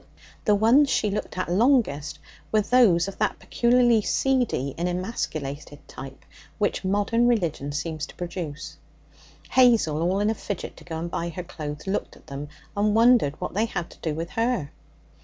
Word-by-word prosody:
The 210 Hz, -, +4 dB
ones 240 Hz, +8 st, +5 dB
she 210 Hz, -5 st, +1 dB
looked 210 Hz, -2 st, -4 dB
at 185 Hz, -, -1 dB
longest 195 Hz, -, +2 dB, 0.3 s
were 215 Hz, -, +4 dB
those 200 Hz, -7 st, +4 dB
of 195 Hz, -, -8 dB
that -, -, 0 dB
peculiarly 240 Hz, -2 st, +3 dB
seedy 245 Hz, -, 0 dB
and 175 Hz, +2 st, -1 dB
emasculated 155 Hz, -7 st, -4 dB
type 135 Hz, 0 st, -10 dB, 0.3 s
which 205 Hz, -1 st, 0 dB
modern 205 Hz, +5 st, +2 dB
religion 170 Hz, -, 0 dB
seems 150 Hz, +1 st, -3 dB
to -, -, -14 dB
produce. 170 Hz, -4 st, -6 dB, 0.7 s
Hazel, 225 Hz, -12 st, +4 dB
all 180 Hz, +3 st, +1 dB
in 210 Hz, +1 st, +2 dB
a -, -, 0 dB
fidget 200 Hz, -3 st, -6 dB
to -, -, -13 dB
go 160 Hz, -, -6 dB
and 170 Hz, +1 st, -4 dB
buy 170 Hz, 0 st, -2 dB
her 175 Hz, +2 st, -6 dB
clothes, 150 Hz, -3 st, -7 dB
looked 195 Hz, +1 st, -3 dB
at -, -, -20 dB
them, 145 Hz, 0 st, -7 dB, 0.3 s
and 210 Hz, +1 st, +2 dB
wondered 230 Hz, -, +4 dB
what -, -, -4 dB
they 215 Hz, +4 st, +1 dB
had 175 Hz, -6 st, -4 dB
to -, -, -16 dB
do 155 Hz, -2 st, -2 dB
with 165 Hz, +2 st, -5 dB
her. 230 Hz, -, -1 dB
185 Hz, 175 wpm, -25 LUFS, 155-225 Hz, 0.7 s, ones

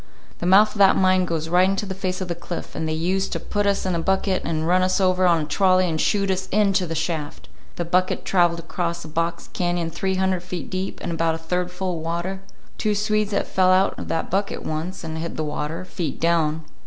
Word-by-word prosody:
The 175 Hz, -, -2 dB
mouth 205 Hz, +4 st, +6 dB
of 210 Hz, -, -8 dB
that 195 Hz, -1 st, +7 dB
mine 185 Hz, -1 st, +3 dB
goes 165 Hz, -2 st, -2 dB
right 180 Hz, +3 st, +4 dB
into 195 Hz, +2 st, -1 dB
the 190 Hz, -, -4 dB
face 185 Hz, -1 st, -3 dB
of 185 Hz, -, -3 dB
the 175 Hz, -, -1 dB
cliff, 170 Hz, +1 st, -7 dB
and 160 Hz, -, -3 dB
they -, -, 0 dB
used 185 Hz, +4 st, 0 dB
to -, -, -2 dB
put 205 Hz, -1 st, -1 dB
us 200 Hz, -1 st, +1 dB
in 185 Hz, -, 0 dB
a 170 Hz, -, 0 dB
bucket 190 Hz, +2 st, +1 dB
and 160 Hz, -1 st, -1 dB
run 180 Hz, +1 st, +4 dB
us 185 Hz, +1 st, +2 dB
over 185 Hz, -1 st, +3 dB
on 170 Hz, -2 st, +3 dB
a -, -, -3 dB
trolley 185 Hz, +1 st, +3 dB
and 160 Hz, -2 st, -1 dB
shoot 200 Hz, -2 st, +1 dB
us 190 Hz, 0 st, -2 dB
into 195 Hz, -3 st, +2 dB
the 165 Hz, -, -4 dB
shaft. 160 Hz, -2 st, -3 dB, 0.3 s
The 175 Hz, -, -3 dB
bucket 185 Hz, +2 st, +1 dB
traveled 175 Hz, -2 st, +3 dB
across 170 Hz, 0 st, -3 dB
a -, -, -7 dB
box 165 Hz, +2 st, -2 dB
cañon 175 Hz, -2 st, -1 dB
three 190 Hz, +3 st, -1 dB
hundred 190 Hz, -1 st, +1 dB
feet 180 Hz, -1 st, -6 dB
deep, 185 Hz, +1 st, -3 dB
and 175 Hz, -, -2 dB
about 165 Hz, -1 st, +1 dB
a -, -, -4 dB
third 180 Hz, +2 st, -2 dB
full 180 Hz, -1 st, -3 dB
of -, -, -7 dB
water. 170 Hz, +4 st, -3 dB, 0.4 s
Two 210 Hz, -1 st, +1 dB
Swedes 215 Hz, 0 st, +1 dB
had 200 Hz, -, 0 dB
fell 185 Hz, -1 st, +2 dB
out 185 Hz, +1 st, +4 dB
of -, -, -6 dB
that 165 Hz, -, -2 dB
bucket 195 Hz, +2 st, -1 dB
once, 165 Hz, +5 st, -4 dB
and 160 Hz, -1 st, -4 dB
hit 170 Hz, +1 st, -4 dB
the 155 Hz, -, -1 dB
water, 155 Hz, +3 st, -4 dB
feet 175 Hz, -2 st, -4 dB
down. 160 Hz, -2 st, +1 dB
180 Hz, 240 wpm, -23 LUFS, 165-190 Hz, 0.4 s, that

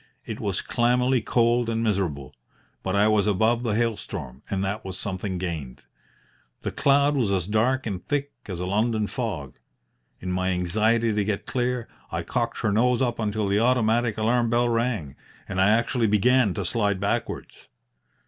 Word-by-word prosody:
It -, -, -6 dB
was -, -, -2 dB
clammily 125 Hz, +1 st, +2 dB
cold 120 Hz, 0 st, +2 dB
and 115 Hz, 0 st, -1 dB
miserable. 90 Hz, -, -1 dB, 0.5 s
But 95 Hz, +1 st, -2 dB
I 100 Hz, +1 st, +4 dB
was 105 Hz, -1 st, +3 dB
above 110 Hz, +4 st, +2 dB
the 115 Hz, -4 st, -1 dB
hail 115 Hz, 0 st, +1 dB
storm, 65 Hz, -7 st, -7 dB
and 95 Hz, 0 st, -1 dB
that 100 Hz, +3 st, -3 dB
was 95 Hz, -1 st, -6 dB
something 95 Hz, -1 st, -3 dB
gained. 80 Hz, -8 st, -5 dB, 0.8 s
The -, -, -2 dB
cloud 140 Hz, +1 st, +3 dB
was 120 Hz, -7 st, +1 dB
as 95 Hz, -3 st, 0 dB
dark 120 Hz, +5 st, +1 dB
and 95 Hz, -5 st, -4 dB
thick 145 Hz, -1 st, -1 dB, 0.2 s
as 90 Hz, -4 st, -5 dB
a 90 Hz, -, -2 dB
London 110 Hz, +3 st, +1 dB
fog. 95 Hz, -, -4 dB, 0.6 s
In 90 Hz, -, -4 dB
my 95 Hz, +1 st, 0 dB
anxiety 110 Hz, +6 st, +1 dB
to 105 Hz, 0 st, +1 dB
get 100 Hz, 0 st, -2 dB
clear, 125 Hz, -1 st, -1 dB, 0.2 s
I -, -, -2 dB
cocked 120 Hz, -1 st, -2 dB
her 110 Hz, -3 st, +1 dB
nose 120 Hz, +3 st, +3 dB
up 120 Hz, -2 st, -1 dB
until 105 Hz, -1 st, -1 dB
the 100 Hz, +1 st, +2 dB
automatic 115 Hz, -1 st, +2 dB
alarm 115 Hz, +2 st, +2 dB
bell 120 Hz, +1 st, +2 dB
rang, 115 Hz, -, -1 dB, 0.3 s
and 95 Hz, -1 st, -1 dB
I 95 Hz, -, +5 dB
actually 115 Hz, +1 st, +2 dB
began 105 Hz, 0 st, +3 dB
to 100 Hz, -, -3 dB
slide 100 Hz, -2 st, 0 dB
backwards. 100 Hz, +1 st, -3 dB
110 Hz, 175 wpm, -25 LUFS, 95-120 Hz, 0.8 s, I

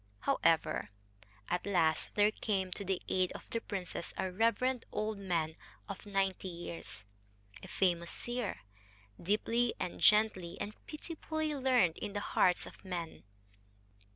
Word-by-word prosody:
However, 155 Hz, -7 st, +2 dB, 0.6 s
at 180 Hz, +3 st, -1 dB
last 165 Hz, -5 st, +2 dB
there 210 Hz, 0 st, +5 dB
came 195 Hz, -4 st, -1 dB
to 200 Hz, -, -2 dB
the 190 Hz, -1 st, -1 dB
aid 185 Hz, -1 st, +2 dB
of -, -, -9 dB
the 230 Hz, -, -1 dB
princess 185 Hz, -5 st, -4 dB
a 190 Hz, -, -1 dB
reverend 230 Hz, +5 st, +2 dB
old 215 Hz, -1 st, -2 dB
man 165 Hz, -5 st, 0 dB, 0.3 s
of 200 Hz, +1 st, -7 dB
ninety 195 Hz, -1 st, 0 dB
years, 165 Hz, -, -6 dB, 0.6 s
a -, -, -9 dB
famous 170 Hz, -3 st, +1 dB
seer, 240 Hz, -3 st, -2 dB, 0.6 s
deeply 230 Hz, +5 st, +1 dB
and 180 Hz, -, -3 dB
gently 210 Hz, -5 st, +4 dB
and 210 Hz, -, -3 dB
pitifully 315 Hz, 0 st, -3 dB
learned 255 Hz, -, +3 dB
in 205 Hz, -, -4 dB
the 205 Hz, -, -1 dB
hearts 180 Hz, -, +4 dB
of -, -, -12 dB
men. 175 Hz, -, -5 dB
195 Hz, 135 wpm, -34 LUFS, 175-220 Hz, 0.6 s, there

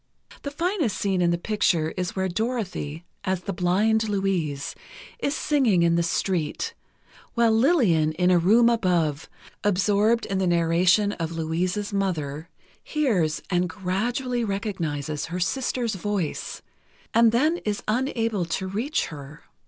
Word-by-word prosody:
The 280 Hz, -, -4 dB
finest 330 Hz, -, -1 dB
scene 190 Hz, -3 st, 0 dB
in 175 Hz, -, +3 dB
the 170 Hz, -, +1 dB
picture 170 Hz, -5 st, +1 dB
is 180 Hz, -2 st, -3 dB
where 190 Hz, 0 st, 0 dB
Dorothy, 185 Hz, -7 st, -3 dB, 0.2 s
as 185 Hz, -1 st, -1 dB
the 195 Hz, -, -4 dB
blind 210 Hz, +5 st, +2 dB
Louise, 185 Hz, -8 st, -1 dB, 0.5 s
is 285 Hz, -8 st, -1 dB
singing 245 Hz, -, +2 dB
in 170 Hz, 0 st, +3 dB
the 170 Hz, -, +2 dB
street, 180 Hz, -, -1 dB, 0.6 s
while 235 Hz, -1 st, +4 dB
Lillian, 220 Hz, -, +3 dB
in 180 Hz, +3 st, +2 dB
a 180 Hz, -, +5 dB
room 220 Hz, +7 st, +5 dB
above, 175 Hz, -10 st, +1 dB, 0.3 s
absorbed 205 Hz, +3 st, +2 dB
in 195 Hz, -1 st, -2 dB
the 190 Hz, -, +1 dB
narration 175 Hz, +4 st, +3 dB
of 165 Hz, -4 st, -4 dB
Louise's 180 Hz, +6 st, -2 dB
mother, 165 Hz, -5 st, -2 dB, 0.3 s
hears 205 Hz, -, 0 dB
and 180 Hz, 0 st, +1 dB
gradually 235 Hz, +8 st, -2 dB
recognizes 165 Hz, -9 st, -3 dB
her 175 Hz, +2 st, -4 dB
sister's 240 Hz, +4 st, -1 dB
voice, 195 Hz, -4 st, -3 dB, 0.5 s
and 230 Hz, 0 st, +5 dB
then 305 Hz, +9 st, +2 dB
is 210 Hz, -9 st, -3 dB
unable 225 Hz, -4 st, 0 dB
to 170 Hz, +3 st, -3 dB
reach 220 Hz, +10 st, -1 dB
her. 145 Hz, 0 st, -10 dB
190 Hz, 135 wpm, -25 LUFS, 170-225 Hz, 0.6 s, a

